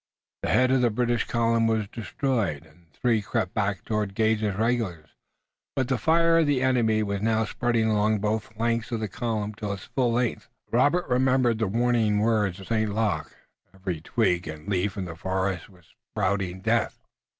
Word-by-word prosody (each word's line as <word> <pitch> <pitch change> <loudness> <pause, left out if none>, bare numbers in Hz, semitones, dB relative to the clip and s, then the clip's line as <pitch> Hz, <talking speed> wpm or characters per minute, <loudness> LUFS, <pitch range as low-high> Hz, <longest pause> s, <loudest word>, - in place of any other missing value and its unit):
The - - -2
head 130 0 +4
of 130 -1 +3
the 120 - +4
British 120 +1 0
column 115 -1 +2
was 110 -2 0
destroyed, 115 - -2
and 80 +2 -23
the - - -31
three 115 -3 +2
crept 95 -2 -2
back 100 -4 -1
toward 105 -3 -2
Gage's 110 -2 +1
regulars, 110 -8 -1 0.7
but 130 -1 0
the 135 - +2
fire 165 +1 +4
of 160 - +3
the 135 -3 +2
enemy 115 -4 +2
was 100 -1 -2
now 110 0 +2
spreading 120 0 0
along 110 0 +2
both 110 +1 -1
flanks 115 +1 -1
of 115 - -1
the 110 - -2
column 110 0 -3
to 105 -2 -3
its 100 - -8
full 125 -4 0
length. 120 0 -1 0.2
Robert 145 +9 +3
remembered 125 -2 +2
the 110 - +1
warning 115 0 +2
words 105 -3 +1
of 95 - -11
St. 110 -2 +1
Luc. 110 -2 -1 0.4
Every 95 -4 -4
twig 90 -2 0
and 80 0 -8
leaf 100 0 -1
in 95 - -2
the 85 -2 -7
forest 95 +1 -2
was 90 -4 -22 0.2
spouting 95 -2 -1
death. - - 0
110 Hz, 185 wpm, -26 LUFS, 100-120 Hz, 0.7 s, head